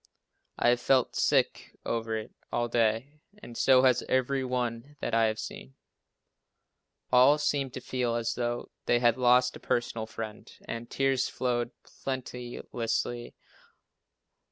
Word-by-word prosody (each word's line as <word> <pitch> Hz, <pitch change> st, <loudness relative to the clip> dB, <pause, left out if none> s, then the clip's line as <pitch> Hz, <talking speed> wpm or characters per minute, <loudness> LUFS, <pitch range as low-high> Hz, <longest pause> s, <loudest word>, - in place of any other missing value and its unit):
I -, -, +3 dB
have 120 Hz, 0 st, +2 dB
felt 130 Hz, -1 st, +2 dB
sick -, -, +1 dB
over 115 Hz, -1 st, -1 dB
it 110 Hz, -, -7 dB, 0.2 s
all 120 Hz, 0 st, 0 dB
day 120 Hz, +5 st, 0 dB, 0.2 s
and 120 Hz, -, -11 dB
so 130 Hz, +1 st, +5 dB
has 125 Hz, -2 st, +4 dB
every 130 Hz, +1 st, +1 dB
one 125 Hz, +2 st, -3 dB
that -, -, -3 dB
I 115 Hz, 0 st, +4 dB
have 110 Hz, 0 st, -1 dB
seen. 65 Hz, -10 st, -8 dB, 1.4 s
All 130 Hz, +4 st, +6 dB
seem 145 Hz, -2 st, 0 dB
to 130 Hz, -, -7 dB
feel 125 Hz, -2 st, -1 dB
as 115 Hz, 0 st, -1 dB
though 120 Hz, 0 st, -3 dB, 0.2 s
they 120 Hz, -, +4 dB
had 120 Hz, -1 st, +3 dB
lost 125 Hz, 0 st, +4 dB
a -, -, -9 dB
personal 115 Hz, -2 st, -1 dB
friend, 110 Hz, -1 st, -7 dB, 0.2 s
and 115 Hz, 0 st, -5 dB
tears 135 Hz, -1 st, +1 dB
flow 120 Hz, -2 st, -1 dB, 0.3 s
plenteously. 120 Hz, -2 st, -3 dB
120 Hz, 135 wpm, -29 LUFS, 115-130 Hz, 1.4 s, All